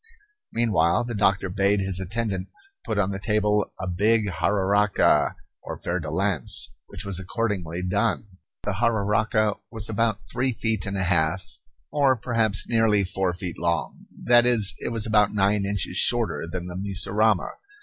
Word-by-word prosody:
Meanwhile 110 -6 +2
the 120 0 -5
doctor 100 -2 +2
bade 100 +2 +1
his 95 -1 -1
attendant 95 -1 -3 0.4
put - - -2
on 100 -1 +1
the 95 - -4
table 105 -1 +1
a 95 - -4
big 105 +5 +2
jararaca, 100 +3 +2 0.3
or - - -7
fer 90 +2 -2
de 80 -3 -5
lance, 90 -6 -1 0.2
which 100 - -7
was 100 -2 -1
accordingly 95 -4 -3
done. 100 +5 0 0.4
The 105 -2 -2
jararaca 110 -1 +1
was 110 -2 -5
about 110 -3 -1
three 130 0 -1
feet 110 -3 -1
and 100 -1 -2
a 95 - 0
half, 85 +1 +1 0.5
or 140 -3 +3
perhaps 115 -3 +1
nearly 115 -3 +3
four 95 0 -1
feet 90 0 -6
long 85 0 -2 0.2
that 120 0 +5
is, 110 -5 +5
it - - -4
was 115 -2 0
about 105 -1 +2
nine 100 0 +2
inches 100 -3 -2
shorter - - +1
than 90 -1 -4
the 90 0 -7
mussurama. 100 +1 +1
100 Hz, 160 wpm, -24 LUFS, 95-110 Hz, 0.5 s, that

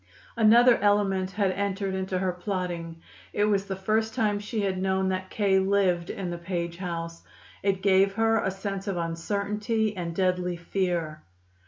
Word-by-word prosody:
Another 235 +2 +6
element 200 -2 +2
had 195 -1 0
entered 195 0 -2
into 190 0 -2
her 185 0 0
plotting. 175 -3 -4 0.3
It 205 - +1
was 200 -2 +1
the 195 - -4
first 220 +3 0
time 210 -2 +1
she 210 +1 -3
had 190 -2 -1
known 190 0 +1
that 185 0 -3
K. 195 -2 +2
lived 190 -3 +1
in 185 -3 -4
the 170 - -5
Page 170 -1 -3
house. 170 -2 -5 0.4
It 195 -1 0
gave 195 0 +4
her 225 +1 +2
a - - +1
sense 195 +1 -5
of 195 -3 -1
uncertainty 205 +6 -1
and 170 -2 -4
deadly 180 -1 0
fear. 170 -3 -2
190 Hz, 165 wpm, -27 LUFS, 180-205 Hz, 0.4 s, Another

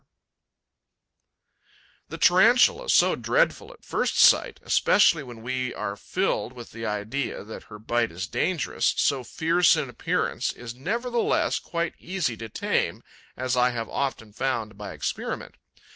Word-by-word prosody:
'The - - -6
Tarantula, 245 - +4
so - - +5
dreadful - - 0
at - - -18
first - - -1
sight, - - +5
especially 175 -6 +4
when 120 -4 -10
we 125 +1 -3
are 100 - -4
filled 110 - -2
with 120 -2 -11
the 115 -1 -5
idea 105 +6 -3
that 110 +2 -10
her 105 - -11
bite 115 +2 -1
is 90 +3 -4
dangerous, 175 - 0
so 135 -3 +1
fierce 165 +7 +3
in - - -2
appearance, - - -1
is 115 -1 -8
nevertheless 235 - 0
quite 170 0 -3
easy 175 -10 -2
to 115 0 -8
tame, - - -1 0.3
as 130 0 -1
I 125 0 +4
have 115 -2 -4
often 115 -6 -3
found 115 -3 -2
by 105 -2 -7
experiment. 75 - -4
125 Hz, 140 wpm, -25 LUFS, 110-170 Hz, 0.3 s, so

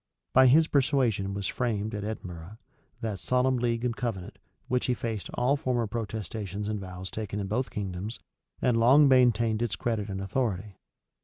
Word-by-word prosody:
By 130 0 +7
his 155 +5 +6
persuasion 125 -9 +1
was 100 -1 -3
framed, 110 -1 -1
at 105 -1 -3
Edinburgh, 95 -2 -6 0.4
that 105 -4 -3
Solemn 125 +3 +2
League 120 0 0
and 120 -2 0
Covenant, 110 -8 -4 0.3
which 125 0 0
effaced 115 -4 -2
all 125 +3 +2
former 125 -5 0
protestations 105 -2 -4
and 105 -1 -2
vows 95 -1 -7
taken 105 -1 -4
in 100 - -2
both 120 +6 -1
kingdoms, 100 +2 -4 0.5
and 125 -2 +3
long 135 +6 +7
maintained 120 -4 +4
its 120 -4 -1
credit 110 -3 -2
and 95 -1 -4
authority. 100 -1 -2
110 Hz, 160 wpm, -28 LUFS, 100-125 Hz, 0.5 s, By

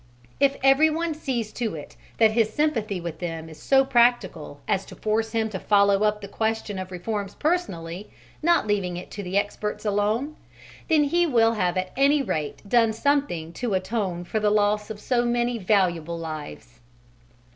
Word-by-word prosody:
If 275 0 +3
everyone 315 +4 +3
sees 245 -8 -3
to 225 -7 -3
it 150 - -9 0.2
that 220 -1 +5
his 220 -1 +2
sympathy 225 -11 0
with 170 -2 -6
them 165 -2 -5
is 155 - -13
so 270 0 +4
practical 235 - +1
as 195 - +1
to - - -11
force 220 +1 -1
him 225 -1 +1
to 190 -3 -5
follow 200 0 +3
up 210 0 +1
the 200 - -7
question 220 -1 -2
of 185 0 -6
reforms 200 +2 -4
personally, 200 - -2 0.3
not 340 -3 +3
leaving 195 -4 -1
it 180 - -9
to 195 -2 -5
experts 210 +1 -2
alone, 215 +8 0 0.5
then 310 -2 +5
he 345 +4 +2
will 230 -5 +3
have 180 -4 0
at 185 0 -2
any 280 +1 +3
rate 155 - -4
done 230 0 +3
something 225 - 0
to 235 -2 -2
atone 185 -2 -2
for 215 +5 -2
the 210 0 +2
loss 210 0 +1
of 215 -1 -6
so 240 +2 +1
many 240 0 0
valuable 175 -5 +1
lives. 150 - -8
210 Hz, 170 wpm, -25 LUFS, 185-245 Hz, 0.5 s, that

